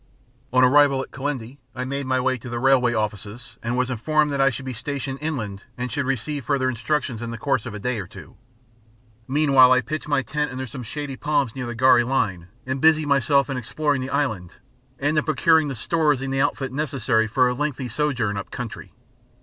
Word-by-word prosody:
On 130 +1 +4
arrival 135 0 +5
at - - -13
Kilindini, 135 -2 -5 0.2
I 125 0 -3
made 140 +1 -3
my 130 0 +1
way 130 +1 +1
to 125 - -9
the 120 - -3
railway 125 -1 +3
Offices 105 +2 -4
and 120 +2 -2
was 130 0 0
informed 150 +5 +1
that 140 -1 0
I 135 - +5
should 130 +1 -6
be 130 - -4
stationed 135 +2 -4
inland 110 -11 -4
and 125 0 -4
should 140 -3 -1
receive 135 +1 -2
further 135 -2 +1
instructions 130 -1 -2
in 120 - -4
the 115 - -5
course 130 -1 -1
of 110 - -6
a - - -6
day 125 +2 -2
or 95 - -6
two. - - -13 0.9
Meanwhile 135 -2 +5
I 130 0 +5
pitched 155 +3 -5
my 145 -2 +1
tent 150 +1 -2
under 130 0 -4
some 130 +1 -8
shady 135 +3 -5
palms 140 -6 0
near 125 -2 -4
the 120 - -5
gharri 125 0 +5
line, 100 -9 -1 0.2
and 130 +1 -3
busied 155 0 +5
myself 140 -1 +3
in 135 - -3
exploring 145 +3 -1
the 130 - -4
island 110 -12 -2 0.4
and 150 +2 +1
in - - -1
procuring 160 0 +3
the 135 - -4
stores 150 +2 +1
and 135 0 -3
the 135 - +1
outfit 135 -2 -1
necessary 130 -6 0
for 125 +3 +3
a 125 - 0
lengthy 140 -1 -2
sojourn 120 -5 -1
up 100 - -6
country. 125 -3 -7
130 Hz, 215 wpm, -23 LUFS, 120-145 Hz, 0.9 s, arrival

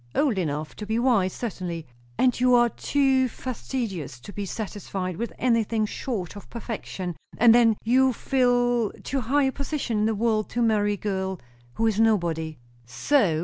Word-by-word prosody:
"Old 260 -10 +2
enough 150 -2 -3
to 210 - -6
be 220 +1 0
wise, 235 -7 +3
certainly." 180 -8 -5 0.3
"And 250 -2 +2
you 250 0 +5
are 240 0 +5
too 265 0 +2
fastidious 225 - -5
to 205 - -10
be 205 -1 -4
satisfied 190 -4 -4
with 235 +3 -3
anything 230 -3 +1
short 205 -5 -4
of 205 - -11
perfection; 205 -6 -5 0.2
and 230 0 +7
then 230 -3 +5
you 260 +3 +4
fill 245 -3 +1
too 270 -1 -2
high 275 +5 +2
a 265 - +2
position 280 -5 -2
in 210 - +2
the 220 - 0
world 215 0 0
to 240 - 0
marry 210 -2 +2
a - - -4
girl 190 -2 -2 0.4
who 225 - +1
is 220 -2 +1
nobody." 170 -8 +1 0.3
"So?" 160 - +1
225 Hz, 170 wpm, -25 LUFS, 190-245 Hz, 0.4 s, and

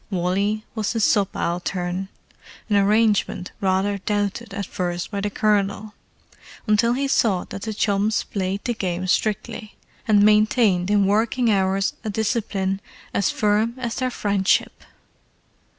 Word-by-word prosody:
Wally 200 +3 -1
was 220 -1 -2
his 225 -2 0
subaltern, 180 -2 -1 0.6
an - - +4
arrangement 205 -2 +2
rather 195 +1 +1
doubted 205 +2 -2
at 200 0 -4
first 175 0 -4
by 200 -1 -3
the 205 - -1
Colonel, 210 0 0 0.7
until 230 +2 +3
he 275 +2 -1
saw 205 -8 +2
that 195 - -7
the 220 +1 -4
chums 210 +1 +1
played 195 0 -3
the 240 - 0
game 185 -4 -3
strictly, 215 +3 -2 0.3
and 205 -2 +5
maintained 210 -3 +3
in 205 -1 +3
working 225 +4 +2
hours 195 0 +1
a 220 - -3
discipline 200 -2 -1 0.3
as 200 - +1
firm 215 +2 +1
as 245 -2 -3
was - - -6
their 255 -1 0
friendship. 200 -5 0
205 Hz, 135 wpm, -22 LUFS, 195-215 Hz, 0.7 s, and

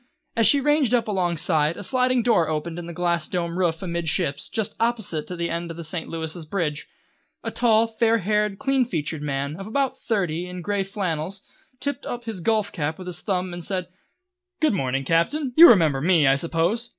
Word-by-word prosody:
As 230 -2 +4
she 285 - +6
ranged 290 -3 +3
up 235 - 0
alongside, 170 -5 +1
a - - -6
sliding 255 +1 +2
door 210 -10 +3
opened 160 +2 -3
in 170 - -7
the - - -6
glass 170 -1 -1
domed 170 -2 -3
roof 175 -2 0
amidships, 170 -4 -1
just 220 -3 -2
opposite 220 -10 -1
to 180 - -5
the 170 0 -3
end 170 0 -3
of 165 - -7
the 170 - -6
St. 160 +1 -3
Louis' 160 +1 -4
bridge. 155 -3 -3 0.6
A - - -3
tall, 230 -2 +3
fair 225 0 +1
haired, 210 0 0
clean 270 +1 +1
featured 160 -8 -3
man, 140 0 -3
of 195 +1 -7
about 270 +3 -1
thirty, 180 -6 -1
in 180 -1 -7
grey 205 0 -1
flannels, 190 -1 -3 0.4
tipped 285 -2 -3
up 240 0 -5
his 220 -6 -5
golf 215 +1 +1
cap 155 -2 -3
with 185 - -9
his 180 -3 -3
thumb, 185 -3 -2
and 175 0 -6
said: 185 0 -3 0.7
"Good 310 -6 +2
morning, 135 -6 -1
Captain! 245 - +1
You 340 +2 +10
remember 160 - +4
me, 165 -1 +4
I 135 - +5
suppose? 170 +10 0
180 Hz, 200 wpm, -23 LUFS, 165-225 Hz, 0.7 s, You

